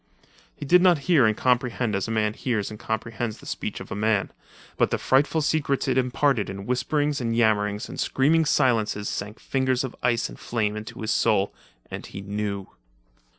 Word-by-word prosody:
He -, -, -7 dB
did 180 Hz, +6 st, +5 dB
not 180 Hz, -2 st, +5 dB
hear 155 Hz, -10 st, +5 dB
and 110 Hz, -, 0 dB
comprehend 125 Hz, -2 st, +1 dB
as 100 Hz, -1 st, -1 dB
a -, -, -6 dB
man 110 Hz, -1 st, +1 dB
hears 110 Hz, -4 st, -2 dB
and 105 Hz, -, -9 dB
comprehends 110 Hz, 0 st, -3 dB
the -, -, -15 dB
speech -, -, -4 dB
of -, -, -10 dB
a -, -, -2 dB
man, 105 Hz, -1 st, +1 dB, 0.4 s
but -, -, +2 dB
the -, -, 0 dB
frightful 145 Hz, +4 st, +2 dB
secrets 145 Hz, -2 st, 0 dB
it 130 Hz, -, +1 dB
imparted 125 Hz, -2 st, +1 dB
in 100 Hz, +1 st, -6 dB
whisperings 145 Hz, +4 st, 0 dB
and 115 Hz, -1 st, -1 dB
yammerings 105 Hz, -2 st, +1 dB
and -, -, -8 dB
screaming 160 Hz, +4 st, +2 dB
silences 110 Hz, -8 st, +1 dB
sank 105 Hz, +3 st, -5 dB
fingers 130 Hz, -1 st, 0 dB
of 130 Hz, -, -5 dB
ice 120 Hz, -1 st, +1 dB
into 110 Hz, -2 st, -4 dB
his 110 Hz, 0 st, -1 dB
soul, 105 Hz, -3 st, +2 dB, 0.4 s
and -, -, -6 dB
he 100 Hz, -, -8 dB
knew. 100 Hz, 0 st, -3 dB
115 Hz, 180 wpm, -25 LUFS, 105-130 Hz, 0.4 s, did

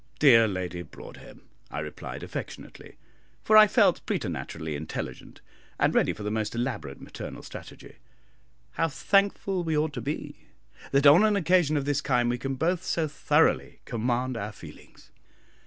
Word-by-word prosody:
"Dear 115 Hz, -6 st, +6 dB
Lady 90 Hz, -3 st, -4 dB
Broadhem," -, -, -13 dB, 0.3 s
I -, -, -7 dB
replied, 75 Hz, 0 st, -6 dB
affectionately, -, -, -8 dB, 0.5 s
for 215 Hz, -, +3 dB
I 215 Hz, 0 st, +9 dB
felt -, -, +3 dB
preternaturally 80 Hz, -1 st, -4 dB
intelligent, 75 Hz, +2 st, -7 dB, 0.4 s
and -, -, +2 dB
ready -, -, +3 dB
for 105 Hz, -, -8 dB
the 105 Hz, -, -2 dB
most 110 Hz, +1 st, -2 dB
elaborate 125 Hz, +2 st, -4 dB
maternal -, -, -9 dB
strategy, -, -, -11 dB, 0.7 s
"how 165 Hz, +5 st, 0 dB
thankful 195 Hz, +4 st, +1 dB
we 160 Hz, -2 st, 0 dB
ought 155 Hz, 0 st, 0 dB
to 125 Hz, -, -5 dB
be 145 Hz, +6 st, -6 dB, 0.4 s
that 140 Hz, +1 st, +3 dB
on 150 Hz, +8 st, +8 dB
an 215 Hz, -1 st, +3 dB
occasion 175 Hz, -4 st, +2 dB
of 140 Hz, -, -2 dB
this 145 Hz, 0 st, 0 dB
kind 120 Hz, -2 st, +1 dB
we 120 Hz, -, -3 dB
can 135 Hz, +3 st, -3 dB
both 175 Hz, +6 st, 0 dB
so 160 Hz, -2 st, -1 dB
thoroughly 150 Hz, -, +1 dB
command 120 Hz, +2 st, -1 dB
our 105 Hz, 0 st, -4 dB
feelings! -, -, -15 dB
135 Hz, 155 wpm, -27 LUFS, 115-165 Hz, 0.7 s, I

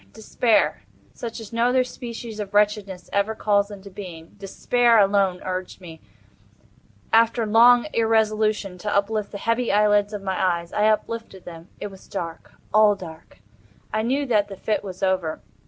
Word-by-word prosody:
Despair—such 230 Hz, +1 st, -2 dB
as 225 Hz, 0 st, -10 dB
no 230 Hz, +1 st, +2 dB
other 255 Hz, 0 st, +3 dB
species 235 Hz, -3 st, -8 dB
of 205 Hz, -1 st, -6 dB
wretchedness 205 Hz, -3 st, +1 dB
ever 200 Hz, +2 st, 0 dB
calls 205 Hz, -1 st, +1 dB
into 200 Hz, -1 st, -11 dB
being—despair 200 Hz, +6 st, -1 dB
alone 195 Hz, -3 st, +3 dB
urged 185 Hz, 0 st, -5 dB
me, 165 Hz, -3 st, -12 dB, 1.1 s
after 230 Hz, 0 st, +4 dB
long 235 Hz, +3 st, +6 dB
irresolution, 215 Hz, -4 st, +1 dB
to 210 Hz, -, -4 dB
uplift 205 Hz, +1 st, 0 dB
the 200 Hz, -, -6 dB
heavy 230 Hz, +4 st, -1 dB
lids 205 Hz, 0 st, +3 dB
of 205 Hz, -2 st, -6 dB
my 190 Hz, -1 st, -2 dB
eyes. 170 Hz, -2 st, -1 dB
I 210 Hz, +1 st, +2 dB
uplifted 220 Hz, -2 st, -2 dB
them. 165 Hz, 0 st, -10 dB
It 205 Hz, -, -6 dB
was 190 Hz, -, -15 dB
dark—all 205 Hz, +4 st, 0 dB
dark. 160 Hz, -, -12 dB, 0.5 s
I 215 Hz, -, +1 dB
knew 265 Hz, +6 st, 0 dB
that 210 Hz, -5 st, +2 dB
the 195 Hz, -2 st, -9 dB
fit 215 Hz, -, -2 dB
was 190 Hz, -1 st, -8 dB
over. 185 Hz, -4 st, 0 dB
205 Hz, 150 wpm, -23 LUFS, 190-225 Hz, 1.1 s, long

